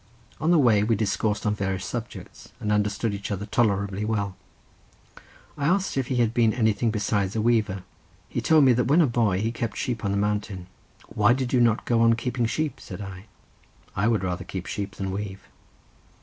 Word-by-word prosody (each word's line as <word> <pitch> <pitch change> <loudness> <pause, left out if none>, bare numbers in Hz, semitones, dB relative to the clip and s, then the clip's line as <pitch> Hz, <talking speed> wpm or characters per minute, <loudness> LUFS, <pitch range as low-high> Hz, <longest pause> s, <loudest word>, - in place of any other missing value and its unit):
On 155 - 0
the 175 - +5
way 115 -8 +4
we 110 +2 +2
discoursed 105 0 -1
on 105 - +2
various 95 -2 -2
subjects, 120 +4 -7
and 105 - -2
understood 105 +1 0
each 100 -1 -5
other 100 0 -3
tolerably 100 -2 0
well. 100 -3 -1 1.2
I 140 - -1
asked 190 +3 +1
if 135 -3 -1
he 130 - -1
had 120 -2 +3
ever - - -10
been 115 -3 +3
anything 110 -1 +2
besides 105 -2 -1
a - - 0
weaver. 110 -5 +1 0.4
He 120 - -3
told 155 +5 +5
me 130 -2 +6
that 125 +1 +1
when 150 +6 +5
a - - +5
boy 115 -7 +1
he 110 +1 0
kept 115 -2 -4
sheep 120 -4 -3
on 100 - 0
the 100 - 0
mountain. 105 -2 -2 0.4
"Why 110 +1 +3
did 130 0 -2
you 125 - +4
not 115 -1 +2
go 115 -1 +2
on 115 0 +5
keeping 120 0 -1
sheep?" 155 +3 -2
said - - -9
I; 95 0 -8 0.7
"I 100 +3 +1
would 110 -4 +1
rather 90 -1 -2
keep 95 -2 -6
sheep 100 -1 -4
than 95 -1 -3
weave." 100 0 -6
110 Hz, 205 wpm, -25 LUFS, 100-120 Hz, 1.2 s, me